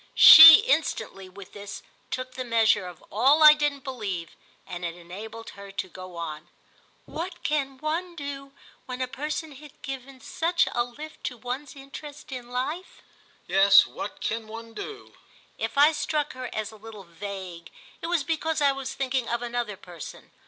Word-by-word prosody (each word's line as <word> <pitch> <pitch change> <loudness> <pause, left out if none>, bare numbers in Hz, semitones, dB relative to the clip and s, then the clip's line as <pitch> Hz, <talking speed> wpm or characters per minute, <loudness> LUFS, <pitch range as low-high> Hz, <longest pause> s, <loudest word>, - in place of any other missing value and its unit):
She 320 +4 +12
instantly, 220 - -1
with 190 0 -13
this, 200 -1 -9 0.3
took 255 0 -5
the 255 - -5
measure 225 -5 +2
of 175 -2 -12
all 275 +9 +4
I 305 0 +11
didn't 295 -2 -2
believe, 200 - -5 0.3
and 175 0 -8
it 170 -1 -4
enabled 210 +6 -10
her 200 0 -12
to 190 - -4
go 185 0 -11
on: 160 -2 -6 0.6
"What 345 +2 -7
can 275 -3 -1
one 330 +5 -3
do 280 -2 -7 0.4
when 250 0 -6
a 255 - -1
person 305 +4 -5
has 295 +2 -13
given 270 0 -7
such 335 +5 0
a 240 - 0
lift 295 +6 -11
to 245 - -4
one's 255 +6 -6
interest 285 +2 -11
in 245 -2 -7
life?" 280 +9 -5 0.4
"Yes, 195 +2 +6
what 205 - -8
can 225 0 -3
one 225 +1 -10
do?" 410 - -9 0.5
If 225 +3 -4
I 295 +2 +7
struck 300 -1 -2
her 255 -1 -7
as 215 -1 -4
a 220 - -14
little 215 -1 -11
vague 180 -1 -8 0.3
it 330 - -4
was 340 -4 0
because 320 +1 -2
I 285 -1 +4
was 270 -1 -6
thinking 260 -2 -2
of 235 +1 -2
another 235 -4 -3
person. 175 -5 -11
250 Hz, 170 wpm, -26 LUFS, 200-295 Hz, 0.6 s, She